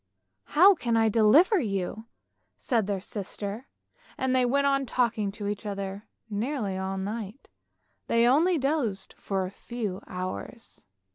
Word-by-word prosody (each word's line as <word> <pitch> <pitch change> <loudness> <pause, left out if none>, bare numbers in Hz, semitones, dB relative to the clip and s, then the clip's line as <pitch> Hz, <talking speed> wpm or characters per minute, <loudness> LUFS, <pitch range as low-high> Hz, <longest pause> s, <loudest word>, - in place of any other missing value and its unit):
" 95 0 -52
" - - -50
How 385 +5 +9
can 235 -9 0
I 225 -1 +4
deliver 270 - +5
you! 205 - -3 0.2
" - - -49
said 225 -5 0
their 200 -2 -1
sister, 205 +4 -6 0.5
and 260 0 0
they 255 -1 +3
went 280 +3 +2
on 275 -1 +2
talking 225 -5 0
to 210 -1 -6
each 205 +1 -3
other, 200 0 -5 0.2
nearly 215 -1 -2
all 190 0 -3
night, 210 +4 -6 0.6
they 230 0 +3
only 320 +8 +4
dozed 260 -9 -1
for 190 -2 -2
a 185 - -6
few 210 -3 -5
hours. 185 +5 -7
220 Hz, 155 wpm, -27 LUFS, 195-260 Hz, 0.6 s, How